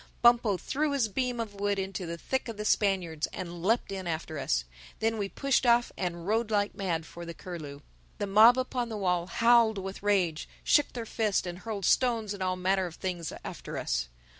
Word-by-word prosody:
Bumpo 235 -4 +5
threw 290 - -1
his 265 -5 +2
beam 250 +3 -1
of 220 -3 -3
wood 200 0 -1
into 190 -2 -3
the 170 0 -4
thick 265 +10 -2
of 230 -3 -6
the 210 - -4
Spaniards 185 -8 +1
and 175 -2 -6
leapt 220 +4 +1
in 190 -2 -4
after 160 -2 -3
us. - - 0 0.3
Then 225 0 0
we 200 -1 -2
pushed 275 +4 +1
off 240 -1 +4
and 175 -2 -3
rowed 220 +3 +1
like 205 -1 +1
mad 175 -5 -2
for 170 +1 -9
the 170 -1 -7
Curlew. 150 -6 -8 0.4
The - - -1
mob 220 +5 +7
upon 255 -2 -1
the 220 - -4
wall 180 -3 0
howled 230 0 +4
with 195 0 -5
rage, 185 -6 +1
shook 295 - +3
their 235 -2 -4
fists 215 -4 0
and 175 0 -5
hurled 205 -3 -4
stones 230 -4 +2
and 200 - -8
all 185 0 0
manner 185 +1 +1
of 170 - -10
things 175 -4 -4
after - - -6
us. - - -1
195 Hz, 205 wpm, -29 LUFS, 175-225 Hz, 0.4 s, mob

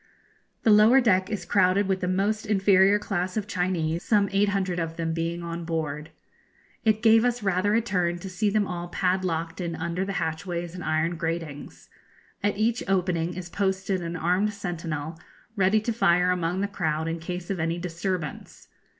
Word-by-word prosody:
The 225 - +5
lower 215 +5 +7
deck 190 -6 +2
is 205 -5 -4
crowded 190 +1 +3
with 190 -1 0
the 180 - -2
most 205 +4 0
inferior 195 -1 +4
class 185 -2 -2
of 210 - -1
Chinese, 175 -4 -1
some 205 -1 +2
eight 200 +1 +2
hundred 190 -3 -1
of 165 -1 -3
them 165 -1 -1
being 170 +1 -2
on 170 0 -5
board. 155 -2 -3 0.7
It 220 0 +2
gave 225 0 +6
us 245 -2 0
rather 195 +2 +1
a 230 - +3
turn 180 -6 0
to 175 - -8
see 200 +3 0
them 210 0 +1
all 175 -2 -5
padlocked 180 -2 -1
in 170 -2 -3
under 170 +3 -2
the 195 0 -3
hatchways 170 0 -3
and 180 -2 -7
iron 160 +2 0
gratings. 160 -3 -5 0.5
At 205 0 0
each 225 +3 +1
opening 180 -3 0
is 180 -1 -6
posted 190 0 -1
an 170 0 -4
armed 180 +5 +1
sentinel, 165 -5 -5 0.4
ready 195 +1 +3
to 230 +2 -2
fire 180 -4 +3
among 180 +1 -1
the 200 - 0
crowd 160 -5 -2
in 165 +1 -3
case 175 +2 -5
of 190 - -2
any 165 +1 -1
disturbance. 175 -2 -5
180 Hz, 180 wpm, -26 LUFS, 170-200 Hz, 0.7 s, lower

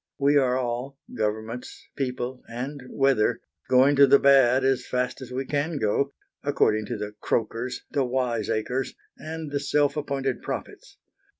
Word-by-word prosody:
We 145 +1 +3
are 130 -3 +3
all 125 +2 -3 0.2
Governments, 110 +2 -4
people, 125 -1 -3
and 130 +5 -5
weather 135 -6 +2 0.3
going 130 +3 +5
to 140 0 +8
the 140 +1 +7
bad 135 -2 +5
as 135 -2 +2
fast 125 +1 -2
as 130 - -8
we 130 +2 -3
can 145 +3 -1
go, 135 +4 +1 0.3
according 110 -7 +1
to 120 - -3
the 105 0 -5
croakers, 115 +2 -2
the 140 - +1
wiseacres, 125 -1 -1 0.2
and 160 -1 -7
the 140 - 0
self 145 0 +1
appointed 135 -3 -2
prophets. - - -7
130 Hz, 145 wpm, -26 LUFS, 120-140 Hz, 0.3 s, to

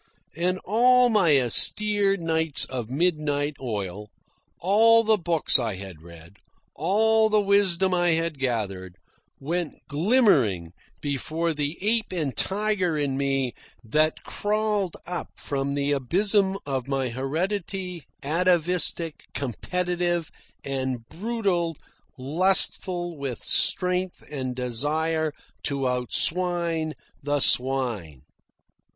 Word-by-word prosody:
And 180 +3 0
all 250 +4 +5
my 175 - +4
austere 200 - +3
nights 160 -3 0
of 125 -4 -6
midnight 150 -1 -1
oil, 105 -4 -5 0.5
all 225 +5 +5
the 220 0 +4
books 165 -4 +3
I 115 -5 -2
had 95 -4 -10
read, 85 +3 -15 0.4
all 220 +6 +3
the 215 0 +3
wisdom 195 -2 +2
I 175 -1 +2
had 165 -3 -2
gathered, 100 -8 -3 0.4
went 165 +3 -3
glimmering 145 - +2 0.3
before 155 +4 -2
the 150 +1 -3
ape 220 +2 0
and 155 -9 -2
tiger 195 - 0
in 140 -2 -1
me 135 -3 -1 0.3
that 155 +7 0
crawled 210 -3 -1
up 180 +1 -5
from 140 0 -3
the 140 0 -1
abysm 190 - +1
of 135 -3 -3
my 135 -2 -1
heredity, 175 - -4 0.2
atavistic, 170 0 +1
competitive 175 - -2 0.3
and 130 -4 -4
brutal, 185 -6 -2 0.4
lustful 175 +3 +2
with 135 -4 -5
strength 180 0 +2
and 130 -3 -4
desire 150 +6 -1 0.3
to 140 -2 -1
outswine 165 +5 0 0.3
the 145 +1 -1
swine. 120 - 0
160 Hz, 105 wpm, -25 LUFS, 135-185 Hz, 0.5 s, all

